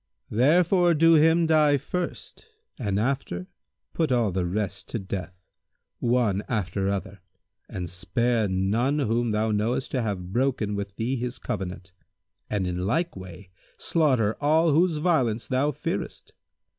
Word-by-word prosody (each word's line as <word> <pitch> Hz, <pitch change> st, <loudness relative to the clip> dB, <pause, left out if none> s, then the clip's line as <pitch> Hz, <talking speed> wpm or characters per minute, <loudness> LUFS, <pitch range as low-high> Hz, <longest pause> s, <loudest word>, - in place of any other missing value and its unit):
Therefore 175 Hz, -, +4 dB
do 165 Hz, +2 st, +5 dB
him 160 Hz, +2 st, +5 dB
die 155 Hz, -3 st, +4 dB
first 180 Hz, -, -5 dB, 0.3 s
and 100 Hz, -5 st, -1 dB
after 115 Hz, -7 st, -2 dB, 0.5 s
put 160 Hz, -4 st, 0 dB
all 120 Hz, -5 st, +2 dB
the 90 Hz, -1 st, -1 dB
rest 100 Hz, +1 st, -3 dB
to -, -, -2 dB
death, 95 Hz, -3 st, -6 dB, 0.5 s
one 115 Hz, -5 st, +1 dB
after 100 Hz, -3 st, -1 dB
other, 100 Hz, -1 st, -4 dB, 0.5 s
and 90 Hz, -4 st, -5 dB
spare 110 Hz, +6 st, 0 dB
none 105 Hz, +9 st, +1 dB
whom 120 Hz, -3 st, 0 dB
thou 110 Hz, +1 st, 0 dB
knowest 110 Hz, +5 st, -1 dB
to 130 Hz, -, 0 dB
have 95 Hz, -5 st, -4 dB
broken 120 Hz, -4 st, 0 dB
with 100 Hz, -1 st, -5 dB
thee 125 Hz, +4 st, -1 dB
his 125 Hz, +1 st, -4 dB
covenant; 95 Hz, -3 st, -5 dB, 0.6 s
and 100 Hz, -3 st, -1 dB
in 90 Hz, +1 st, -2 dB
like 170 Hz, -, 0 dB
way 95 Hz, 0 st, -10 dB, 0.3 s
slaughter 130 Hz, -10 st, +1 dB
all 160 Hz, +3 st, +3 dB
whose 165 Hz, +2 st, +3 dB
violence 130 Hz, -9 st, +1 dB
thou 135 Hz, +3 st, +1 dB
fearest. -, -, -5 dB
115 Hz, 140 wpm, -26 LUFS, 100-145 Hz, 0.6 s, do